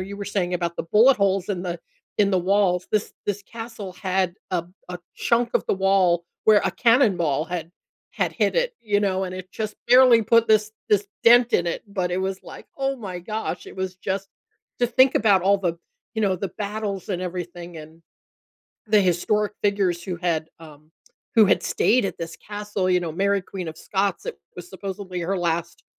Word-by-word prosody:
you 195 +2 -6
were 200 - -5
saying 185 -3 -1
about 170 -1 -2
the - - -2
bullet 235 +6 +7
holes 195 -2 0
in 185 -3 -2
the 175 -1 -4 0.4
in 200 -1 +3
the 190 - +2
walls, 185 -1 +1
this 215 -1 0
this 205 0 -2
castle 225 -3 -8
had 185 -1 -1 0.2
a 175 -2 0 0.2
a 180 0 -6 0.2
chunk 235 0 +1
of - - +2
the - - +1
wall 190 -3 +2 0.2
where 215 -1 +6
a - - +2
cannonball 190 - +2
had 170 -2 -5 0.4
had - - -1
hit - - 0
it, - - +1
you 205 -3 +1
know, 190 -2 0
and 185 0 -5
it 185 0 -9
just 215 -1 -4
barely 250 -2 +7
put 230 +2 +3
this 215 0 +3 0.2
this 205 -1 +2 0.2
dent 240 +1 +6
in 175 - +2
it, 170 - -2
but 185 -3 -2
it 180 +1 -1
was 190 0 -3
like, - - -11
"Oh 270 0 0
my 190 -7 -6
gosh," 215 +5 -4
it - - -11
was 185 -1 -4
just 195 +1 -3 0.5
to 245 - +3
think 260 +2 +4
about 200 -4 +4
all 200 +2 +4
the, 175 -4 -1 0.4
you 220 - -1
know, 195 -2 +2
the 185 +1 -4
battles 205 -2 -4
and 180 -2 -2
everything 175 -1 -6
and 160 +1 -12 0.9
the 210 -1 +5
historic 200 +3 +1
figures 195 -4 +1
who 180 -1 -4
had, 165 -2 -1
um, 155 -1 -15 0.4
who 225 - +7
had 195 - +3
stayed 245 0 +2
at 195 - -4
this 165 -1 -6
castle, 205 -2 -4
you 180 - +4
know, 170 -3 -4
Mary, 200 +3 +1
Queen 180 -2 -6
of 160 - -8
Scots, 195 +2 -1
it - - -4 0.2
was 180 -1 -9
supposedly 190 -1 -6
her 185 +3 -1
last, 170 -1 -2
195 Hz, 200 wpm, -23 LUFS, 180-210 Hz, 0.9 s, bullet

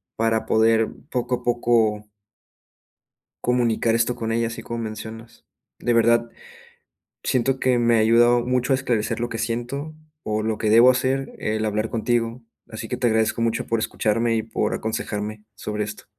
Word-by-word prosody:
para 115 0 0
poder 110 0 +3 0.2
poco 125 0 0
a - - -10
poco 115 -3 +1 1.4
comunicar 120 -2 +2
esto 115 +1 +1
con 115 0 -3
ella, 115 0 +1
así 115 - -6
como 115 - -5
mencionas. 110 +1 -8 0.3
De 120 - 0
verdad, 115 0 +3 0.9
siento 130 +1 +1
que 130 -1 +3
me 120 0 +3
ha - - +3
ayudado 120 +2 +4
mucho 125 +2 0
a - - +4
esclarecer 120 -5 -1
lo 120 - -1
que 115 - -5
siento, 120 +7 -3 0.3
o 110 0 -2
lo 110 0 -1
que 110 - 0
debo 115 +3 +7
hacer, 130 +1 0
el 110 0 -2
hablar 110 +1 -1
contigo. 115 +1 -1 0.3
Así 110 0 -7
que - - -2
te 120 - +1
agradezco 110 +1 +1
mucho 115 -1 0
por 115 -1 0
escucharme 115 +2 0
y 110 - 0
por 110 -1 -2
aconsejarme 105 -1 -4
sobre 105 +1 -3
esto. 105 0 -8
115 Hz, 165 wpm, -23 LUFS, 110-120 Hz, 1.4 s, debo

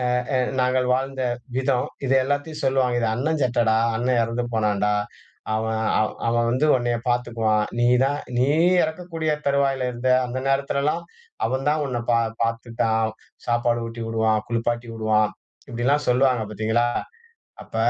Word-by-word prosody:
ஆ, - - +2 0.2
ஆ - - +4 0.2
நாங்கள் 125 0 +2
வாழ்ந்த 135 +1 -2 0.4
விதம். 130 -1 +1 0.2
இதை 135 0 +2
எல்லாத்தயும் 145 +3 -3
சொல்லுவாங்க. 130 -2 +2
"இது 115 - +1
அண்ணன் 145 +6 -1
சட்டைடா, 120 -3 +2 0.2
அண்ணன் 120 +1 +1
எறந்து 115 +2 -2
போனான்டா. 105 -1 +1 0.6
அவன் 110 0 -1 0.2
அ - - +4 0.3
அவன் 115 0 +1
வந்து 130 +5 +2
உன்னைய 120 -1 0
பாத்துக்குவான். 115 -3 +1
நீ 120 - +3 0.2
தான் 145 +2 -1 0.2
நீ 125 +2 +3 0.4
இறக்கக்கூடிய 160 -1 -3 0.2
தருவாயில 135 -2 +1
இருந்த. 120 +1 -2 0.2
அந்த 125 +1 -5
நேரத்தில 140 0 0
எல்லாம் 160 +4 0 0.4
அவன் 130 +2 -2
தான் 150 0 +1
உன்னை 120 -3 -2
பா 115 - +4 0.2
பாத்துக்டான். 115 -1 0 0.4
சாப்பாடு 120 0 +1
ஊட்டி 115 0 -6
உடுவான், 110 -1 +2
குளிப்பாட்டி 120 0 -1
உடுவான்." 110 -1 +2 0.4
இப்படியெல்லாம் 135 +4 0
சொல்வாங்க 125 -1 +3
பாத்தீங்களா? 110 +3 +1 0.8
அப்ப - - -9
120 Hz, 145 wpm, -23 LUFS, 115-135 Hz, 0.8 s, ஆ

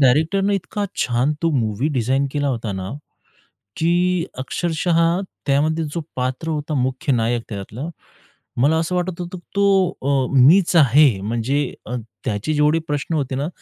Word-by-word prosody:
डायरेक्टरने 160 +10 +3
इतका 200 +2 -3
छान 125 +4 +1
तो 165 - +2
मूव्ही 115 +2 0
डिझाइन 130 +3 +1
केला 145 -1 0
होता 115 -5 -2
ना 95 0 -5 0.9
की 175 +1 +2
अक्षरशः 165 +4 -1 0.5
त्यामध्ये 155 +4 +1
जो 170 - -1 0.2
पात्र 130 +5 -2
होता 150 0 -3
मुख्य 130 +3 0
नायक 115 0 +1
त्याच्यातला, 110 +8 -6 0.7
मला 155 +3 +4
असं 165 +3 -1
वाटत 180 0 -2
होतं 175 +1 -5
की - - -18
तो 195 -2 +4
अ, 135 -1 +1 0.2
मीचं 175 +2 +5
आहे. 135 -6 +5
म्हणजे 120 +7 -1
अ, 125 - -3 0.3
त्याचे 105 +9 -2
जेवढे 150 +2 +3
प्रश्न 145 +3 -2
होते 135 -4 -1
ना. 145 +4 -1
145 Hz, 150 wpm, -21 LUFS, 125-165 Hz, 0.9 s, मीचं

